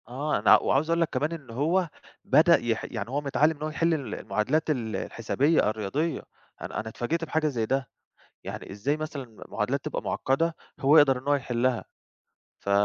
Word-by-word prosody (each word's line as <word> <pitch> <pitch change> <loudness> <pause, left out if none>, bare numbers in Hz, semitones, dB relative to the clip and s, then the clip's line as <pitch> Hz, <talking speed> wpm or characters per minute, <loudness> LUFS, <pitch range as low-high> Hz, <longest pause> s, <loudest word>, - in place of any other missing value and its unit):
آه، 145 +5 -1
أنا - - +7
وعاوز 150 +4 +1
اقول 165 0 +2
لك 165 - +2
كمان 150 +2 -1
إن 155 -7 -8
هو 165 +9 +1 0.4
بدأ 170 +2 +6
يح 115 -2 -2
يعني 110 -2 -5
هو 140 +3 -1
متعلّم 150 +3 +2
إن 150 - -7
هو 155 - -1
يحل 165 +2 +1
المعادلات 145 0 -1
ال 120 -7 -1
الحسابية 140 +4 +1
الرياضية، 110 +10 -2 0.4
أنا - - -4
أنا 110 0 -4
اتفاجئت 155 +9 -2
بحاجة 160 -1 0
زي 120 -6 -1
ده، 130 0 -1 0.5
يعني - - -7
إزاي 130 +10 -1
مثلًا 155 -3 -5
المعادلات 115 -3 -4
تبقى - - -3
مُعقدة 165 +5 0 0.2
هو 145 +4 +5
يقدر 140 -4 +6
إن 130 - -13
هو 145 - +4
يحلّها 125 -2 -1 0.7
ف - - -6
140 Hz, 180 wpm, -27 LUFS, 120-155 Hz, 0.7 s, أنا